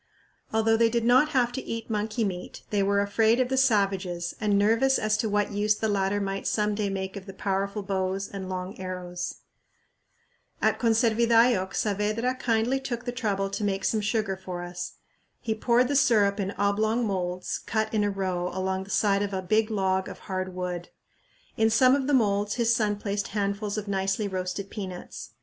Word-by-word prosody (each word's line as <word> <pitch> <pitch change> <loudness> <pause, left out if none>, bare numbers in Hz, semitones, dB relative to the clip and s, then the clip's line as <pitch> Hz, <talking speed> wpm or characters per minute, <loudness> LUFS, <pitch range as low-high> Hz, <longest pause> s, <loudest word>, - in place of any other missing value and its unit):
Although 225 0 +3
they 230 0 +4
did 235 0 0
not 255 +5 +5
have 250 -5 +2
to 265 - -4
eat 230 -2 -5
monkey 215 +1 -1
meat, 180 -3 -5
they 205 -1 +2
were 200 +1 +2
afraid 220 +4 +2
of 255 -1 +1
the 265 - +1
savages 195 -8 +1
and 205 -2 +2
nervous 230 +6 +3
as 215 0 +1
to 220 -1 -1
what 205 0 +1
use 210 +1 +2
the 220 - -1
latter 200 -1 +1
might 195 -1 -3
some 210 -1 +1
day 205 -1 -1
make 190 0 -4
of 200 0 -8
the 195 - -9
powerful 200 +1 -2
bows 190 0 -1
and 190 -2 -7
long 185 +1 -5
arrows. 180 -1 -5 1.2
At - - +1
Conservidayoc 230 -3 +3
Saavedra 215 +4 0
kindly 235 +3 +1
took 245 -2 -5
the 245 - -2
trouble 200 -5 -1
to 210 - -3
make 195 -1 -1
some 220 - +1
sugar 210 -2 0
for 185 -2 -6
us. 175 0 -6 0.5
He 220 - -1
poured 240 +3 +2
the 285 - -1
syrup 215 -7 +3
in 195 -1 -1
oblong 215 +4 +1
moulds 180 -3 -2
cut 220 0 -2
in 215 -1 +2
a 205 - +1
row 185 -3 -2
along 190 +1 -2
the - - -15
side 200 -1 +2
of 205 -1 -2
a 190 - -3
big 215 +4 +2
log 190 -3 0
of - - -10
hard 185 -1 -4
wood. 180 -1 -4 0.7
In 220 0 +4
some 255 +3 +5
of 275 -2 -1
the 290 - +3
moulds 205 -3 +1
his 235 -1 +2
son 210 -2 +1
placed 205 0 -3
handfuls 200 0 -2
of 210 -1 -4
nicely 195 +1 0
roasted 190 +1 -4
peanuts. 185 -4 -7
205 Hz, 190 wpm, -27 LUFS, 190-225 Hz, 1.2 s, not